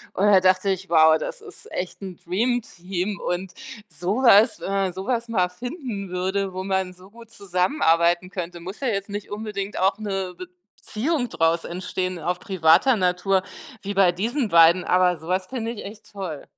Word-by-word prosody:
Und 195 - +2
da 205 -2 +6
dachte 185 +1 +3
ich: 190 0 -4
„Wow, 160 -1 +6
das - - -6
ist - - -13
echt 180 +2 -5
'n 190 -3 -7
Dreamteam.” 195 -2 -2
Und 180 +1 -3 0.3
so 205 +7 -2
was 230 -1 +6
wenn - - -5
man 195 -2 0
so 190 +2 -6
was 240 -2 -1
mal 185 -6 +1
finden 240 - -6
würde, 190 +2 -2
wo 185 0 -4
man 190 -1 -1
so 185 +2 -17
gut 230 0 -15
zusammenarbeiten 180 - +1
könnte. 175 -2 -6
Muss 185 +4 -8
ja 270 - -2
jetzt 200 -3 -2
nicht 205 0 -6
unbedingt 205 -1 -5
auch 190 +2 +1
'ne 195 -3 -3
Beziehung 215 - -4
draus 165 +1 +1
entstehen 185 0 -4
auf 180 +3 -2
privater 190 +5 +4
Natur 185 +1 +1 0.4
wie 200 0 -3
bei 195 -2 +4
diesen 230 +7 -2
beiden, 170 +1 +6
aber 180 0 +3
so 160 +2 -11
was 185 0 0
finde 230 -3 -4
ich 230 - -8
echt 210 +2 -11
toll. 185 -7 -6
190 Hz, 180 wpm, -23 LUFS, 180-210 Hz, 0.4 s, da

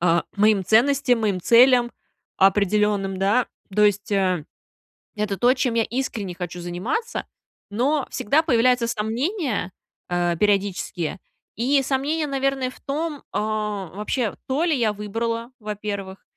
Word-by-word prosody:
а, 170 -1 +3
моим 205 -2 +3
ценностям, 250 +3 +3
моим 200 -4 0
целям 240 +2 +5 0.5
определенным, 195 0 +2
да. 205 +6 +2 0.3
То 210 +1 +4
есть, 205 0 +1
э, 185 -5 +1 0.7
это 210 -2 -2
то, 245 +6 +4
чем 250 -2 0
я 230 -1 +2
искренне 220 -7 -3
хочу 175 0 -6
заниматься, 180 - -3 0.5
но 270 +7 +1
всегда 300 +10 +2
появляются 250 -4 +3
сомнения, 235 - -2 0.4
э, 175 -1 0
периодические. 195 -3 0 0.4
И 270 +5 +2
сомнения, 285 +4 -1
наверное, 275 -1 0
в - - -15
том 295 +1 -3
а, 210 -2 -2
вообще, 210 +1 -2
то 270 +5 0
ли 320 -5 +2
я 220 -3 +1
выбрала, 230 +3 -3
во-первых. 205 -2 -5
215 Hz, 130 wpm, -23 LUFS, 195-260 Hz, 0.7 s, целям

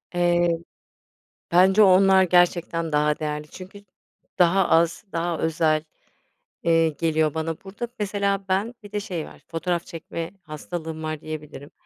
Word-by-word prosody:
Eee, 175 0 +3 1.0
bence 190 +4 +6
onlar 190 0 +6
gerçekten 175 -2 +2
daha 150 0 +2
değerli, 150 0 -4
çünkü 195 +4 -12 0.5
daha 180 +1 +4
az 165 0 +2
daha 170 -1 -1
özel, 155 -1 +1 0.8
eee, 165 -1 +3
geliyor 155 -1 0
bana. 160 0 -2
Burada 200 +5 -6
mesela 200 -1 -1
ben, 200 +6 0
bir 205 - -12
de 210 - -2
şey 180 -6 -5
var - - -14
fotoğraf 170 +1 -2
çekme 165 0 -6
hastalığım 160 +1 -6
var 155 -1 -4
diyebilirim. 150 -2 -8
170 Hz, 130 wpm, -24 LUFS, 160-190 Hz, 1.0 s, bence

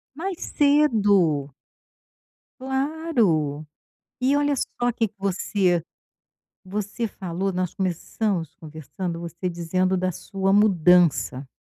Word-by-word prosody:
Mais 360 +2 -4
cedo. 205 - +3 1.1
Claro, 260 - 0 0.6
e 265 +3 +2
olha 290 0 +2 0.3
só 245 0 +3
que 225 -1 0
que 200 - -25
você 190 -2 0 0.8
você 205 +4 -3
falou, 190 -1 -3
nós 180 -1 -2
começamos 185 -2 -2
conversando 160 +3 -6
você 170 +2 -4
dizendo 185 +2 0
da 185 0 0
sua 195 +2 -1
mudança. 180 -8 +3
190 Hz, 100 wpm, -24 LUFS, 170-225 Hz, 1.1 s, cedo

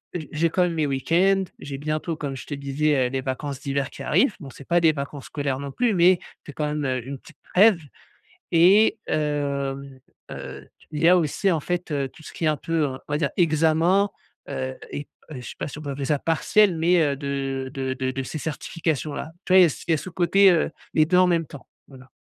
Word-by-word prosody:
heu, - - -1
j 155 - -8
j'ai 165 +2 +2
quand 180 +3 +2
même 175 -1 0
mes 155 -2 0
week-ends. 175 +8 +2
J'ai 140 -1 -6
bientôt 155 +3 -3
comme 140 -2 -4
je 130 - -8
te 145 - -5
disais, 140 -1 +1
heu, - - -5
les 135 0 -2
vacances 135 +1 -4
d'hiver 140 -1 -2
qui - - -9
arrivent. 255 -7 +2
Bon 140 - -8
c'est 135 +1 -13
pas 175 0 +3
des 160 - +5
vacances 140 -1 -6
scolaires 140 -3 -2
non 140 -1 -5
plus 235 - +1
mais, 180 0 +5 0.2
que 145 - -9
quand 150 +2 -3
même, 150 0 -2
heu, 130 -1 -2
une 140 0 -5
petite 160 +2 -17 0.2
trêve 200 -1 +6 0.7
et 185 +6 +5
hem, 140 -3 -2 0.3
heu, - - -8
tu - - -24
il 155 +1 -3
y - - +6
a 180 - +7
aussi 175 +5 0
en 160 - +1
fait, 175 +2 -3
heu, 140 -2 -1
tout 160 +2 -17
ce - - -11
qui 165 - -3
est - - +3
un 155 -1 +1
peu 165 +1 0
un 130 0 -6
on 145 - -4
va 145 - +2
dire 145 -3 +1
examen, 165 +4 +3 0.4
heu 130 0 -4 0.2
et 145 - -5 0.2
heu, - - -6
je - - -8
sais 120 - -8
pas - - -3
si 145 - -8
on 155 - -7
peut 140 - -4
appeler 140 0 -4
ça 150 +2 +1
partiel 175 +5 +2
mais, 175 +2 +4
heu, 145 -3 +2
de 135 -1 -3
de 130 -2 -3
de 130 0 -2
de 135 +1 -3
ces 155 - -5
certifications 155 -1 -3
là. 150 - -5 0.2
Tu 185 - +1
vois 190 - +9
il - - +9
y 180 - +8
a - - +4
s 150 - -6
il - - +1
y - - +5
a - - +2
ce 185 - -7
côté, 190 +3 +4
heu, 165 - +1 0.2
les 155 - +5
2 180 +3 +2
en 185 0 +6
même 170 -2 +1
temps. 140 -1 -12 0.2
Voilà. 130 -2 -15
150 Hz, 260 wpm, -24 LUFS, 140-170 Hz, 0.7 s, vois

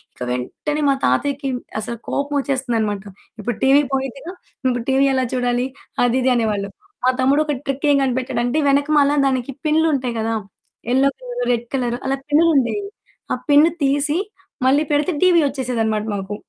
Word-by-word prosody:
ఇక - - -22
వెంటనే 295 - -3
మా 275 - +3
తాతయ్యకి 280 -1 0 0.3
అసలు 235 +2 -5
కోపం 285 +1 -2
వచ్చేస్తుందనమాట. 235 -7 -1 0.4
"ఇప్పుడు 220 +1 -3
టీవీ 275 +2 +6
పోయిద్దిగా. 270 +6 -4 0.4
ఇప్పుడు 245 -2 -1
టీవీ 275 +1 +4
ఎలా 260 - +1
చూడాలి?" 245 0 0 0.4
అది 245 +1 +2
ఇది 260 - +3
అనేవాళ్ళు. 210 -4 0 0.4
మా 255 - +5
తమ్ముడు 275 +3 +3
ఒక 295 - 0
ట్రిక్ 275 +2 -1
ఏం - - +4
కనిపెట్టాడంటే. 255 +1 0
వెనక 280 +1 +2
మల 280 0 +4
దానికి 260 -1 0
పిన్లుంటాయి 300 -6 +1
కదా! 225 0 -1 0.5
యెల్లో 265 +3 +4
కలర్, - - -4
రెడ్ 240 0 0
కలర్ 245 -3 0
అలా 270 - +1
పిన్లు 305 +3 +4
ఉండేవి. 340 - +1 0.5
ఆ - - +2
పిన్ 290 +2 +7 0.2
తీసి 285 +3 +1 0.5
మళ్ళీ 285 +3 +4
పెడితే 295 +4 +1
టీవీ 355 -2 +5
వచ్చేసేదనమాట 225 -5 -1
మాకు. 195 +1 -4
265 Hz, 155 wpm, -20 LUFS, 240-285 Hz, 0.5 s, పిన్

